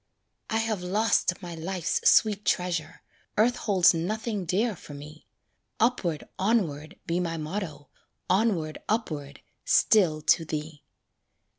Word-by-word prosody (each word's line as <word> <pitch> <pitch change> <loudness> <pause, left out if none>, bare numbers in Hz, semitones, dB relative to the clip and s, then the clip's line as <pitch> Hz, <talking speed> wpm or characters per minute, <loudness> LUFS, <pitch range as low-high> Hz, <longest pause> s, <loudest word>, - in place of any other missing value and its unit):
I 225 - 0
have 225 -4 -1
lost 195 0 +1
my 175 -1 -6
life's 170 +1 0
sweet 210 -2 +4
treasure, 170 -4 -1 0.3
Earth 235 +3 +4
holds 190 -5 +4
nothing 205 +4 -2
dear 205 +5 0
for 145 -3 -11
me; 150 +2 -12 0.5
"Upward, 195 - +1 0.2
onward," 185 -7 0
be 170 +1 0
my 165 -2 -2
motto, 155 -2 -5 0.4
Onward, 185 -6 +1
upward, 150 - -3 0.2
still 165 -8 +3
to 165 - +4
thee. 155 -1 -5
180 Hz, 120 wpm, -27 LUFS, 155-210 Hz, 0.5 s, sweet